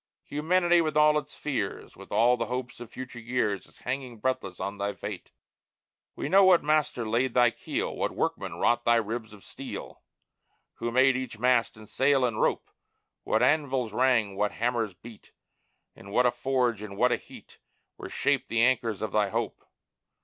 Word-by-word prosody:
Humanity 175 +3 +2
with 155 -2 -1
all 150 0 +5
its 150 0 -12
fears, 120 -10 -4
With 95 - -13
all 115 +4 +4
the 115 -2 -3
hopes 125 0 -5
of 120 -2 -9
future 125 -1 -8
years, 115 -4 -1
Is - - -23
hanging 125 -2 -4
breathless 130 -6 -2
on 100 +1 -4
thy 100 0 -1
fate! 90 - -7 0.9
We - - -4
know 195 +6 +6
what 185 -2 +6
Master 150 -6 +1
laid 120 +3 0
thy 120 -2 +5
keel, - - -4
What - - -1
Workmen - - -2
wrought 120 - +1
thy 120 - +4
ribs 115 0 -2
of 105 -2 -14
steel, - - -8 0.8
Who 120 - -2
made 130 +2 +4
each 130 -3 -4
mast, 125 -1 +2
and 110 0 -13
sail, 135 +1 +2
and 115 -3 -1
rope, - - 0 0.5
What - - +2
anvils 135 -7 +1
rang, 115 -6 +2
what 105 +1 0
hammers 115 -4 -1
beat, 110 +3 -14 0.6
In 100 - -13
what 125 +5 +2
a 125 - +4
forge 120 -3 0
and 100 -2 -8
what - - +3
a - - +2
heat - - -15 0.4
Were - - -8
shaped 140 -2 0
the 115 0 +2
anchors 120 -4 +1
of 110 - -3
thy 105 -2 +2
hope! - - -3
120 Hz, 180 wpm, -27 LUFS, 110-130 Hz, 0.9 s, know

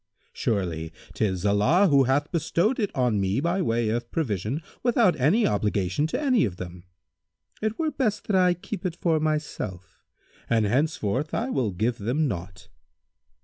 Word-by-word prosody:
Surely, 85 -6 -2 0.2
'tis 95 -3 -1
Allah 125 - +4
who 140 -4 +4
hath 145 +4 +1
bestowed 170 - +1
it 205 -3 +1
on 120 -6 +1
me 95 +5 0
by 170 +5 0
way 115 -7 +1
of 120 +1 -2
provision 120 - -2 0.2
without 235 -6 +3
any 185 - +3
obligation 105 - 0
to - - -2
any 260 -6 +3
of 95 -6 -1
them. 90 0 -8 0.8
It 220 +1 -1
were 315 -2 0
best 245 -7 -1
that 205 - 0
I 180 -1 +4
keep 185 +2 -7
it 180 -3 -2
for 165 -2 +1
myself, 150 - -3 0.5
and 115 -2 +3
henceforth 130 +2 0
I 245 +4 -1
will 125 - 0
give 110 +6 -1
them 130 +9 0
naught." 90 -4 -6
135 Hz, 160 wpm, -25 LUFS, -, 0.8 s, Allah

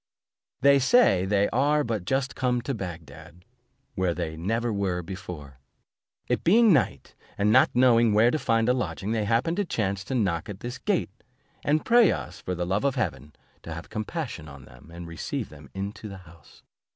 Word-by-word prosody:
They 140 0 +6
say, 135 - +4
they 100 +1 +2
are 145 +5 +2
but 110 -7 -3
just 135 +3 -1
come 125 -2 0
to 140 - -2
Bagdad, 85 - -9 0.5
where 90 -2 0
they 80 -3 -4
never 115 +8 -1
were 95 -3 -1
before; 85 -7 -9 0.7
it - - -1
being 220 +3 +5
night, 135 -7 0 0.2
and 105 +1 +2
not 130 +4 +6
knowing 120 -2 +5
where 110 +3 +4
to 155 - -1
find 115 -4 +1
a 125 - +4
lodging, 95 - -3
they 110 -2 0
happened 120 - +1
by 205 - +2
chance 100 - -2
to 135 - -3
knock 95 -8 -1
at 100 -1 -8
this 120 +2 -6
gate, 200 - -1 0.5
and 150 +2 +1
pray 235 -4 +6
us, - - -6
for 90 - -3
the 90 0 -2
love 95 +6 -1
of 140 -2 +1
heaven, 75 - -3 0.3
to 80 - -9
have 80 +1 -8
compassion 110 - -5
on 70 -2 -12
them, 65 +5 -17
and 85 0 -8
receive 85 0 -5
them 75 -2 -14
into 100 +2 -5
the 100 - -8
house. 85 -4 -18
105 Hz, 190 wpm, -26 LUFS, 85-125 Hz, 0.7 s, They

